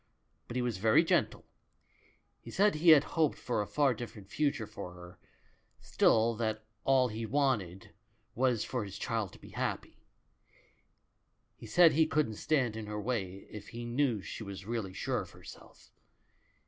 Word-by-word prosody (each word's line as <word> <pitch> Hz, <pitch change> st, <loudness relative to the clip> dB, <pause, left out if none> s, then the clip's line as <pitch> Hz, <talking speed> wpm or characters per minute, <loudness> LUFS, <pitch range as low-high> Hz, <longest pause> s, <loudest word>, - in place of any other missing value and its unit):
But 120 Hz, -, -7 dB
he 125 Hz, -, 0 dB
was 120 Hz, -4 st, -2 dB
very 110 Hz, +2 st, +5 dB
gentle. -, -, 0 dB, 0.9 s
He -, -, -12 dB
said 205 Hz, +2 st, +3 dB
he 160 Hz, +3 st, +3 dB
had 150 Hz, -3 st, +9 dB
hoped 155 Hz, -3 st, 0 dB
for 120 Hz, -4 st, -1 dB
a 105 Hz, -, -4 dB
far 145 Hz, -3 st, +2 dB
different 110 Hz, -4 st, -9 dB
future 140 Hz, -7 st, 0 dB
for 95 Hz, -3 st, -8 dB
her, 90 Hz, 0 st, -13 dB, 0.6 s
still 115 Hz, +1 st, +3 dB
that 110 Hz, -1 st, -2 dB, 0.2 s
all 130 Hz, -2 st, +3 dB
he 110 Hz, +1 st, -5 dB
want 135 Hz, -1 st, +2 dB
ed 90 Hz, +1 st, -12 dB, 0.4 s
was 125 Hz, -3 st, +1 dB
for 125 Hz, -4 st, -3 dB
his 100 Hz, -1 st, -8 dB
child 110 Hz, -3 st, -2 dB
to -, -, -14 dB
be -, -, -13 dB
happy; -, -, -4 dB, 1.6 s
he -, -, -11 dB
said 175 Hz, -2 st, +6 dB
he 160 Hz, +1 st, +3 dB
couldn't 145 Hz, -9 st, 0 dB
stand 130 Hz, -8 st, +1 dB
in 110 Hz, -1 st, -6 dB
her 105 Hz, 0 st, -4 dB
way 100 Hz, -4 st, -3 dB
if 105 Hz, -1 st, -9 dB
he 120 Hz, 0 st, -7 dB
knew 120 Hz, -4 st, 0 dB
she -, -, -7 dB
was 100 Hz, -1 st, -8 dB
really 110 Hz, -4 st, -3 dB
sure 95 Hz, -, -2 dB
of -, -, -9 dB
herself. -, -, -14 dB
115 Hz, 170 wpm, -32 LUFS, 105-135 Hz, 1.6 s, had